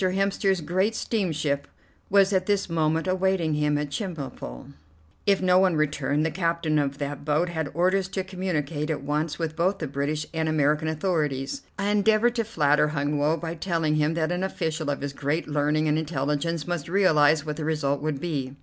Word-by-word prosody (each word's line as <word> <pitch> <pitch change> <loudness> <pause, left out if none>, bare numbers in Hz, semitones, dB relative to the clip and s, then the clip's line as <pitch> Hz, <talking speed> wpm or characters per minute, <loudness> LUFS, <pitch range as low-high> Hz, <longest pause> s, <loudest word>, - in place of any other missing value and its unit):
Hemster's 195 0 +1
great 185 +7 0
steamship 155 -11 -1 0.4
was 200 0 +4
at 185 -1 +1
this 205 -1 +1
moment 160 0 +1
awaiting 185 -3 +1
him 150 0 +1
at 145 -1 -3
Chemulpo. 140 - -6 0.5
If 195 -2 +3
no 180 0 +5
one 185 -3 +3
returned, 150 0 0
the 160 - 0
captain 165 -3 0
of 140 -1 -1
that 145 -1 -4
boat 155 +4 +1
had 160 -4 -3
orders 185 +2 +2
to 190 0 -3
communicate 165 -5 -3
at 150 -3 -2
once 150 +2 -1
with 160 -2 -3
both 185 +4 +1
the 165 - -4
British 145 +2 -2
and 160 -1 -1
the 155 - 0
American 150 +1 +2
authorities. 155 - -1 0.2
I 200 0 0
endeavored 215 +3 +3
to 230 - +2
flatter 150 -8 +2
Hun 145 -1 -1
Woe 150 +3 +2
by 165 0 -4
telling 165 -3 0
him 155 +2 +1
that 160 0 0
an 180 +1 -1
official 160 -5 -2
of 140 - -2
his 140 -1 -4
great 145 +4 -2
learning 150 +1 +1
and 150 +1 +2
intelligence 150 +1 -1
must 175 -3 -3
realize 155 -5 +4
what 150 -1 -4
the 160 - -4
result 145 -3 0
would 150 -2 -2
be. 140 -6 -3
160 Hz, 190 wpm, -26 LUFS, 150-185 Hz, 0.5 s, no